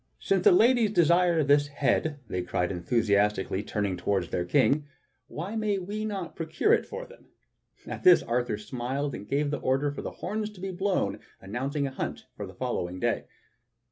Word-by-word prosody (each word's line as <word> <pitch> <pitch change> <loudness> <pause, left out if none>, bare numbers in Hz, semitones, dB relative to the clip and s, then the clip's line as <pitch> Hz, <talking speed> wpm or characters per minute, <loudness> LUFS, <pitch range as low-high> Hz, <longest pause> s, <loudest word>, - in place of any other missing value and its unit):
"Since - - 0
the 415 - +9
ladies 240 - +5
desire 175 -3 +4
this 145 +1 +4
head," 145 +1 0
they 90 -3 -2
cried 90 0 -1
enthusiastically, 100 +1 +1
turning 105 -3 -2
toward 90 0 -1
their 90 - -1
King, 145 +7 +2 0.4
"why 185 +8 -5
may 215 -2 0
we 205 +4 -4
not 195 -5 -4
procure 165 - +1
it - - +2
for 485 +2 -6
them?" - - -17 0.6
At - - -6
this 365 - +7
Arthur 120 -2 -1
smiled, 125 +6 -3
and 100 - -7
gave 145 +1 +1
the 145 - -2
order 135 +3 +1
for 145 - -6
the - - -4
horns 210 +3 -4
to 195 - -14
be 190 +1 -4
blown 185 - -1 0.2
announcing 135 +8 -2
a 135 - -3
hunt 130 - -5
for - - -6
the - - -12
following 90 +1 -3
day. - - 0
145 Hz, 180 wpm, -28 LUFS, -, 0.6 s, the